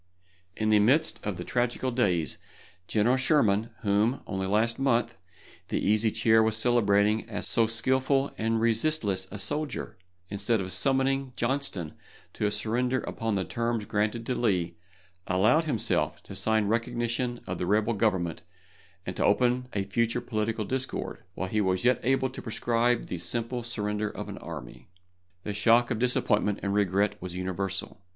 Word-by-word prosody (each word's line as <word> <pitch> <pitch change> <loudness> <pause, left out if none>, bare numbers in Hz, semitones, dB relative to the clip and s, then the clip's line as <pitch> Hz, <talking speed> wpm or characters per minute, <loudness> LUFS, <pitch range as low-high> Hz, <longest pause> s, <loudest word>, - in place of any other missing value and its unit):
In 110 0 0
the 105 -1 +5
midst 140 +10 +3
of 100 -3 -3
the - - -5
tragical 125 +1 -1
days 90 -10 0 0.5
General 115 +4 +2
Sherman, 115 -6 +2
whom, 105 +5 +2
only 95 -1 -3
last 110 +5 +1
month, 120 -3 +1 0.5
the - - -1
Easy 110 +2 +2
Chair 110 +1 +4
was 110 0 +2
celebrating 110 -2 +2
as 105 - -3
so 115 -1 +2
skilful 130 +4 +1
and 115 0 0
resistless 110 -4 +1
a 105 - -7
soldier, 145 +2 -3 0.3
instead 100 +3 0
of 95 -1 -4
summoning 135 0 +1
Johnston 120 - -1 0.4
to 105 - 0
a - - -1
surrender 120 +5 0
upon 115 -2 -3
the 95 - 0
terms 115 +3 -2
granted 105 +3 -1
to 130 - -1
Lee, 90 -8 0 0.5
allowed 110 - +3
himself 130 -9 0
to - - -10
sign 110 -1 +1
recognition 120 +2 -1
of 90 -1 -4
the 90 - -2
rebel 110 +3 +2
government 95 -6 0 0.6
and 90 - -4
to - - +1
open 125 +4 +2
a 100 - 0
future 115 +4 0
political 110 -2 -2
discord, 130 +3 -3
while 95 - -3
he 105 +3 0
was 95 +1 0
yet 125 -1 +4
able 130 +1 +1
to - - -8
prescribe 120 +1 0
the 90 - -5
simple 115 +8 -2
surrender 105 -2 -2
of - - -7
an - - -7
army. - - -9 0.5
The 105 - -3
shock 115 +4 +4
of 115 - -1
disappointment 105 -4 +1
and 100 0 0
regret 100 0 +1
was 90 -1 -6
universal. 95 +1 -3
110 Hz, 160 wpm, -28 LUFS, 100-120 Hz, 0.6 s, the